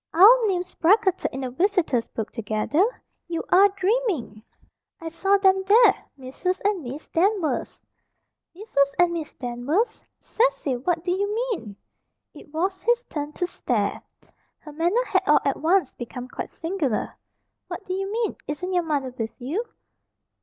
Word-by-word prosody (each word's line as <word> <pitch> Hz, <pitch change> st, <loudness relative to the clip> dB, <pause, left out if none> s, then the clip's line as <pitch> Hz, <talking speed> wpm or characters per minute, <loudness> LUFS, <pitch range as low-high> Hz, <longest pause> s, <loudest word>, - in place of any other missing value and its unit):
"Our 445 Hz, +6 st, +8 dB
names 365 Hz, -2 st, -2 dB
bracketed 380 Hz, +2 st, +2 dB
in 265 Hz, -, -5 dB
the 255 Hz, -1 st, -4 dB
visitors 325 Hz, -, +1 dB
book 220 Hz, -2 st, -5 dB
together! 220 Hz, -, 0 dB, 0.4 s
You 335 Hz, -1 st, -3 dB
are 390 Hz, +3 st, +6 dB
dreaming!" 385 Hz, -, -1 dB, 0.6 s
"I 330 Hz, -, -5 dB
saw 390 Hz, +5 st, +2 dB
them 385 Hz, -1 st, +3 dB
there 430 Hz, 0 st, +7 dB, 0.2 s
Mrs. 280 Hz, +8 st, -3 dB
and 405 Hz, -3 st, +1 dB
Miss 270 Hz, +5 st, -7 dB
Danvers." 370 Hz, -1 st, 0 dB, 0.7 s
"Mrs. 280 Hz, -9 st, 0 dB
and 350 Hz, -1 st, +3 dB
Miss 320 Hz, -2 st, -5 dB
Danvers! 255 Hz, -, -2 dB, 0.2 s
Cecil! 440 Hz, -, 0 dB
what 335 Hz, +5 st, -1 dB
do 355 Hz, -, -1 dB
you 405 Hz, +3 st, 0 dB, 0.2 s
mean?" 220 Hz, -, -5 dB, 0.6 s
It 290 Hz, -, -14 dB
was 370 Hz, +4 st, -2 dB
his 480 Hz, +1 st, +2 dB
turn 295 Hz, -1 st, -4 dB
to 355 Hz, -, -1 dB
stare. 355 Hz, -, -2 dB, 0.6 s
Her 300 Hz, -, -12 dB
manner 350 Hz, +11 st, +1 dB
had -, -, +2 dB
all -, -, +5 dB
at -, -, +1 dB
once 340 Hz, -3 st, +2 dB
become 245 Hz, +1 st, -7 dB
quite -, -, -6 dB
singular. 325 Hz, -, -2 dB, 0.5 s
"What -, -, -7 dB
do 370 Hz, -, -3 dB
you 390 Hz, +1 st, -3 dB
mean? 455 Hz, +1 st, -1 dB
Isn't 360 Hz, +6 st, -4 dB
your 355 Hz, -, +3 dB
mother 285 Hz, -6 st, -2 dB
with 225 Hz, 0 st, -5 dB
you?" 300 Hz, -, -2 dB
350 Hz, 155 wpm, -24 LUFS, 280-390 Hz, 0.7 s, Our